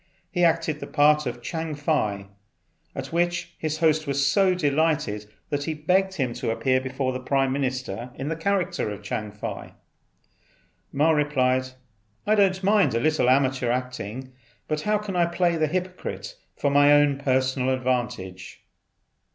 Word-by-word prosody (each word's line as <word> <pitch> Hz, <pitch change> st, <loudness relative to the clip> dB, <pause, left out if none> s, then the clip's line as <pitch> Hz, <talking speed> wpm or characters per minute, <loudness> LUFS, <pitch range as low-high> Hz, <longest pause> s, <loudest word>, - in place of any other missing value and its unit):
He 175 Hz, -2 st, 0 dB
acted 165 Hz, -2 st, +2 dB
the -, -, -7 dB
part 150 Hz, -1 st, +3 dB
of 120 Hz, 0 st, -5 dB
Chang 160 Hz, 0 st, -4 dB
Fei, 110 Hz, -10 st, -1 dB, 0.7 s
at -, -, -6 dB
which 175 Hz, +1 st, 0 dB
his 155 Hz, -1 st, -2 dB
host 155 Hz, -1 st, +2 dB
was 140 Hz, 0 st, +1 dB
so 185 Hz, +6 st, +3 dB
delighted 145 Hz, -, 0 dB, 0.2 s
that 145 Hz, -1 st, -1 dB
he 160 Hz, -, -2 dB
begged 190 Hz, +5 st, +1 dB
him 130 Hz, -7 st, -1 dB
to 125 Hz, -1 st, -3 dB
appear 130 Hz, +3 st, +1 dB
before 130 Hz, 0 st, -2 dB
the 130 Hz, -, -3 dB
Prime 135 Hz, +1 st, +1 dB
Minister 130 Hz, -4 st, -3 dB
in 135 Hz, -, -5 dB
the 160 Hz, -, -1 dB
character 180 Hz, -, -1 dB
of 105 Hz, -, -7 dB
Chang 105 Hz, -1 st, -4 dB
Fei. 105 Hz, -, -7 dB, 1.2 s
Ma 150 Hz, +3 st, +3 dB
replied, 130 Hz, -4 st, +1 dB, 0.6 s
"I 215 Hz, -, +3 dB
don't 195 Hz, -2 st, +3 dB
mind 200 Hz, -, +3 dB
a -, -, +2 dB
little 155 Hz, -1 st, +2 dB
amateur 130 Hz, -2 st, +2 dB
acting, 125 Hz, 0 st, -4 dB, 0.3 s
but 155 Hz, 0 st, -1 dB
how 210 Hz, +3 st, +1 dB
can 205 Hz, -2 st, -5 dB
I 175 Hz, -1 st, +3 dB
play 170 Hz, 0 st, +1 dB
the 155 Hz, -1 st, +1 dB
hypocrite 185 Hz, -, -4 dB, 0.2 s
for 140 Hz, -, 0 dB
my 145 Hz, +1 st, +5 dB
own 145 Hz, -1 st, +4 dB
personal 130 Hz, -1 st, +1 dB
advantage?" 120 Hz, -8 st, -3 dB
145 Hz, 160 wpm, -25 LUFS, 130-165 Hz, 1.2 s, my